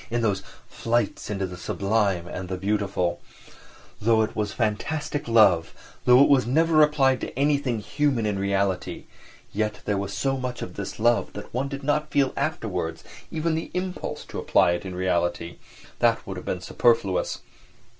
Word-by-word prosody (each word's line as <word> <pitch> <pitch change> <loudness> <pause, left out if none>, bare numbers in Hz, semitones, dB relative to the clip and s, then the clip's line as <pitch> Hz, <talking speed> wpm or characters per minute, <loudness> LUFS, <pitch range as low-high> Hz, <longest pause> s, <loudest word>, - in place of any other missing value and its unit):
in 120 0 -1
those 100 -3 +1 0.3
"flights 115 -2 -1
into 100 -2 -1
the 90 -1 -7
sublime 100 -1 0
and 90 0 -6
the 95 - -2
beautiful"; 95 -3 -1 0.8
though 110 0 +4
it 110 - -4
was 105 -2 -1
fantastic 145 +8 -2
love, 100 -8 +4 0.3
though 125 +2 +7
it - - +5
was 135 -4 +4
never 160 +4 +4
applied 135 -3 +3
to - - -4
anything 140 -3 +1
human 130 +1 0
in 105 -2 -1
reality, 100 -2 -1 0.5
yet 105 +1 -2
there 100 -2 0
was 100 0 -4
so 135 +6 -1
much 125 -1 -4
of 90 - -7
this 100 0 -6
love 120 +1 +2
that 105 - -9
one 130 +3 -1
did 140 0 -6
not 150 +2 0
feel 140 -2 +2
afterwards - - -2 0.3
even 165 0 -1
the 160 +1 -3
impulse 180 0 -4
to - - -6
apply 85 - +3
it 85 +2 -2
in 90 - -6
reality; 85 -1 -1 0.4
that - - +2
would - - -6
have - - -8
been - - -2
superfluous. 100 -6 +1
110 Hz, 170 wpm, -25 LUFS, 95-135 Hz, 0.8 s, though